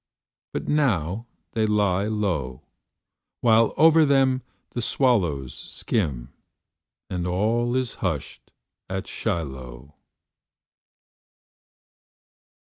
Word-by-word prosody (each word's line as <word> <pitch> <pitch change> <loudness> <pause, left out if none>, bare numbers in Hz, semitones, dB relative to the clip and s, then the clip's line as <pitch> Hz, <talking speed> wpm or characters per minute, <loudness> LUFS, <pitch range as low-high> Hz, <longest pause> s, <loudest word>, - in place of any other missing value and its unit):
But - - -4
now 115 - +1 0.2
they 110 -1 +1
lie 100 -2 +2
low, 85 -13 -2 0.8
While 115 -1 +5
over 160 +1 +7
them 135 -3 +3 0.3
the 120 - -3
swallows 90 - +1
skim 65 - -3 0.7
And 90 -1 -3
all 115 +7 +1
is 130 -3 0
hushed 80 -7 -3 0.4
at 95 0 -3
Shiloh. 65 -3 -4
100 Hz, 80 wpm, -25 LUFS, 75-120 Hz, 0.8 s, over